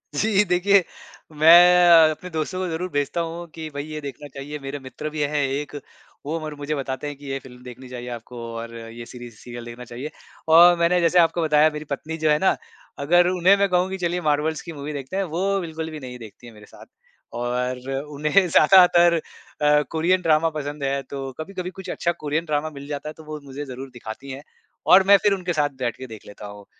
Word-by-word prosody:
जी, 210 +4 +3
देखिए, 185 +2 +3 0.5
मैं 175 +3 +7 0.2
अ, - - 0
अपने 180 +4 -8
दोस्तों 160 +3 -3
को 185 - -2
ज़रूर 175 +3 -3
भेजता 145 +4 -1
हूँ 170 +1 -6
कि, 160 -1 -6
"भई, 145 0 -5
ये 155 -1 -7
देखना 140 0 -8
चाहिए।" 145 +2 -7
मेरे 135 +1 -6
मित्र 135 +3 -7
भी 150 0 -4
हैं 145 0 0
एक, 145 +2 -4 0.5
वो 160 +3 -2
मर 155 -1 -6
मुझे 145 +1 -4
बताते 135 0 -4
हैं 145 - -5
कि, 145 - -14
"ये 135 - -2
फ़िल्म 125 -2 -15
देखनी 125 +1 -11
चाहिए 125 0 -7
आपको 120 +1 -11 0.2
और 115 0 -7
ये 115 +1 -9
सीरीज़, 120 -2 -11
सीरियल 120 -1 -9
देखना 120 +1 -9
चाहिए।" 140 +6 -6 0.5
और 175 0 +8
मैंने 175 +1 +3
जैसे 170 +1 +4
आपको 170 0 +3
बताया, 155 0 +4
मेरी 150 - -8
पत्नी 160 +3 -5
जो 155 - +4
है 150 - +4
ना, - - +4 0.5
अगर 175 +3 +4
उन्हें 185 +2 +4
मैं 200 -1 +2
कहूँ 180 +1 +1
कि, 190 - -4
"चलिए, 175 +1 -1
मार्वल्स 150 +2 0
की 165 - -6
मूवी 145 +1 -6
देखते 140 +4 -6
हैं।" 195 - +1
वो 185 - -1 0.2
बिल्कुल 160 -1 -5
भी 155 - -7
नहीं 125 -2 -8
देखती 115 +2 -13
हैं 115 - -13
मेरे 105 -1 -15
साथ। - - -14 0.6
और 125 +1 -2 0.3
उन्हें 155 +6 +2
ज़्यादातर 175 +1 +6 0.5
अ, 150 0 +4
कोरियन 175 +3 +1
ड्रामा 165 -1 +3
पसंद 145 -1 -5
है, 140 0 -1
तो 135 0 -6
कभी-कभी 180 +2 -5
कुछ 190 -1 -8
अच्छा 170 - -1
कोरियन 155 +3 -1
ड्रामा 155 0 -1
मिल 140 0 -10
जाता 145 +1 -5
है, - - -8
तो 160 - -12
वो 155 0 -7
मुझे 140 +2 -7
ज़रूर 135 0 -8
दिखाती 120 +3 -9
हैं 135 +2 -8 0.5
और 190 - +8
मैं 200 0 +8
फिर 205 -1 +4
उनके 180 -2 -2
साथ 150 -2 +1
बैठ 120 -2 -2
के 130 - -8
देख 110 -2 -11
लेता 105 0 -10
हूँ। 100 0 -11
150 Hz, 220 wpm, -23 LUFS, 135-170 Hz, 0.6 s, और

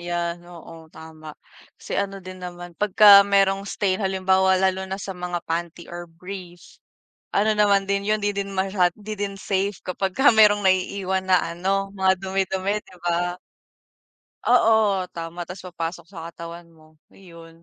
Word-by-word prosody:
'Yan, 175 0 -3
oo, 165 -1 -12
tama. 155 -1 -12 0.4
Kasi - - -10
ano 195 0 -4
din 185 0 -9
naman, 175 -1 -8
pag 210 -2 -1
ka 205 -2 +10
merong 195 0 +2
stain 190 -1 -1
halimbawa 190 -1 +2
lalo 190 0 0
na 190 - -3
sa 195 -1 -6
mga 180 -1 -5
panty 170 +1 -4
or 175 0 -7
brief. 175 +1 -11 0.5
Ano 215 +2 +3
naman 200 -2 +3
din 200 0 0
yun, 215 0 +1
'di 205 0 0
din 200 0 -3
masya 190 -2 +1
'di 215 0 -7
din 200 0 -3
safe 195 -1 -2
kapag 190 +1 -2
ka 270 +2 +5
merong 210 -2 +5
naiiwan 190 0 0
na 185 -1 +5
ano, 195 +2 -1
mga 190 -1 +3
dumi-dumi, 190 +1 -1
'di 185 - -17
ba? 175 +1 0 1.1
Oo, 220 -6 +3
tama, 170 +1 -6
ta's 185 +2 -9
papasok 170 -1 -5
sa 165 -4 -8
katawan 170 0 -9
mo, 155 -1 -22 0.2
iyon, 165 -3 -15
190 Hz, 160 wpm, -23 LUFS, 175-195 Hz, 1.1 s, ka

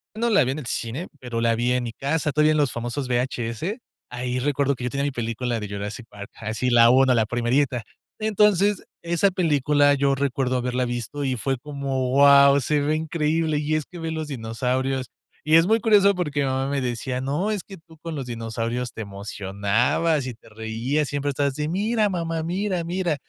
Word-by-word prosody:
No 235 +2 0
la 195 -9 +5
vi 130 - -1
en 145 - -4
el 145 - -8
cine, 120 +8 -3
pero 120 -2 -4
la 115 0 +2
vi 120 +2 +1
en 125 0 0
mi 115 - -4
casa, 150 +4 -1
todavía 150 +1 +3
en 155 - +2
los 145 -3 +2
famosos 120 +3 -4
VHS. 125 - -2 0.3
Ahí 125 0 -3
recuerdo 140 +1 +1
que 125 - -8
yo - - -1
tenía 140 +2 -2
mi 145 - 0
película 120 -1 -2
de 105 - -5
"Jurassic 105 +4 -6
Park", 100 0 -10
así 115 +3 -2
la 120 -1 +6
1. 130 +1 +5
la 115 -2 +2
primerita. 120 +2 0 0.4
Entonces, 210 -2 +2 0.2
esa 170 +3 +2
película 150 -5 +3
yo 140 0 +2
recuerdo 135 -2 0
haberla 125 0 -1
visto 120 +4 -4
y 130 -2 0
fue 135 +3 -1
como: 135 -2 -3
wao, 140 0 +7
se 150 +4 +1
ve 150 +2 +1
increíble. 155 0 0
Y 150 +1 0
es 155 -2 -1
que 175 - -11
ver 165 -1 -3
los 160 -1 -4
dinosaurios 130 +1 -2 0.4
Y 155 +1 +3
es 165 +1 +6
muy 225 +2 +3
curioso 205 -3 +4
porque 150 -5 -2
mi 140 - +1
mamá 130 0 -1
me 140 -1 -1
decía: 125 +1 -3
"No, 150 +11 -1
es 205 -5 -2
que 195 - -11
tú 160 0 -19
con 165 0 -6
los 135 -3 -4
dinosaurios 115 +1 -3
te - - -6
emocionabas 100 - -1
y 125 - -4
te 115 - -19
reías. 115 +7 -2
Siempre 145 0 -2
estabas 140 0 0
así: 150 +2 -3
'Mira, 210 +4 +1
mamá, 165 -3 -2
mira, 185 +1 -1
mira'". 175 -1 -1
140 Hz, 205 wpm, -24 LUFS, 120-160 Hz, 0.4 s, wao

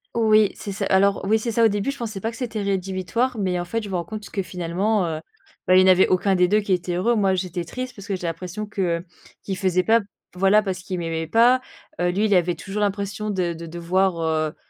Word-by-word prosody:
Oui, 215 -2 +4
c'est 200 - -6
ça 195 0 -3
alors 195 +1 +3
oui, 220 +3 +3
c'est 230 +1 -3
ça. 230 +1 +2
Au - - +7
début, 205 +5 -1
je 280 - -9
pensais 220 -5 -5
pas 225 - -2
que - - -11
c'était 230 -5 -3
rédhibitoire, 195 +6 -1
mais 185 -3 0
en 175 - -3
fait, 230 +5 -3
je 205 - -7
me 190 - -3
rends 170 - -1
compte 215 +1 -7
que 195 - -2
finalement, 180 +3 -1
heu, 160 -2 -3 0.5
bah 185 - +5
il 185 - +8
y - - +5
en 190 - +4
avait 185 0 +6
aucun 190 +1 +2
des 180 0 +4
2 210 +4 +3
qui 200 -2 0
était 180 0 -1
heureux. 230 +7 +2
Moi, 195 -3 +2
j'étais 180 -1 -3
triste 255 +4 -6
parce 200 0 -11
que 195 - -1
j'ai 180 - -6
l'impression 180 +5 -4
que, 205 -1 -5 0.2
heu, 175 - -12 0.4
qui 195 - -3
faisait 185 -2 +1
pas, 225 +4 +4 0.4
voilà, 195 +3 +4
parce 190 -2 -3
qu'il 185 0 -5
m'aimait 165 -1 -3
pas. 240 +7 +4 0.4
Heu, 175 - +2
lui, 200 +4 +1
il 210 - +2
avait 175 -1 +2
toujours 205 +1 -5
l'impression 200 +1 -2
de 180 -4 -1
de 165 0 -8
devoir, 175 +2 0
heu, 155 -1 0
195 Hz, 255 wpm, -23 LUFS, 180-215 Hz, 0.5 s, il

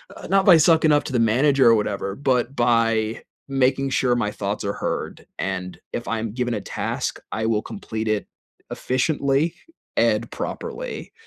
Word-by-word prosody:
Uh, - - -9
not 195 0 +3
by 185 - +9
sucking 160 -1 +4
up 145 0 +4
to 135 - -5
the 125 - +2
manager 130 +4 +4
or - - +7
whatever, 100 -2 -2
but 130 0 0
by 115 -2 +1 0.3
making 135 0 +1
sure 125 -2 +2
my 120 -4 0
thoughts 100 0 -3
are 100 - -1
heard, - - -4
and 90 -1 -4
if 120 - -4
I'm 115 -2 -2
given 120 0 -1
a - - -3
task, - - -3
I 110 - -2
will 110 -2 +1
complete 110 - -5
it 110 -1 0 0.4
efficiently 140 +4 0 0.4
and - - +2
properly, - - -6
120 Hz, 165 wpm, -23 LUFS, 110-140 Hz, 0.4 s, by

